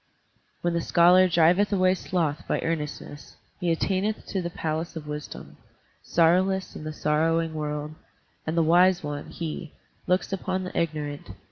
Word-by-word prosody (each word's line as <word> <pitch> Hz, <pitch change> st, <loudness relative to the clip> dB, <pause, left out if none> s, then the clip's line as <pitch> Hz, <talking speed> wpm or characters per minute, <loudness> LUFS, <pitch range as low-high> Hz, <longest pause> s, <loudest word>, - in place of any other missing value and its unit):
"When 175 Hz, 0 st, 0 dB
the 170 Hz, -, 0 dB
scholar 180 Hz, +3 st, +5 dB
driveth 175 Hz, +4 st, +3 dB
away 185 Hz, -2 st, +3 dB
sloth 165 Hz, -5 st, -2 dB
by -, -, 0 dB
earnestness, 150 Hz, -2 st, -5 dB, 0.2 s
He 175 Hz, -3 st, 0 dB
attaineth 195 Hz, +5 st, -1 dB
to 195 Hz, -, -1 dB
the 170 Hz, -, -3 dB
palace 160 Hz, 0 st, -3 dB
of 160 Hz, -2 st, -6 dB
wisdom, 150 Hz, 0 st, -7 dB, 0.4 s
Sorrowless 185 Hz, +3 st, +2 dB
in -, -, -7 dB
the 155 Hz, -, -3 dB
sorrowing 160 Hz, +2 st, +1 dB
world, 150 Hz, 0 st, -4 dB, 0.5 s
And 160 Hz, +2 st, -1 dB
the 165 Hz, -, +4 dB
wise 175 Hz, +2 st, +4 dB
one, 145 Hz, -1 st, -5 dB
he, 165 Hz, -1 st, -6 dB, 0.3 s
looks 185 Hz, +1 st, +1 dB
upon 185 Hz, 0 st, -2 dB
the 185 Hz, -, -7 dB
ignorant. 150 Hz, -3 st, -3 dB
165 Hz, 150 wpm, -26 LUFS, 155-185 Hz, 0.5 s, scholar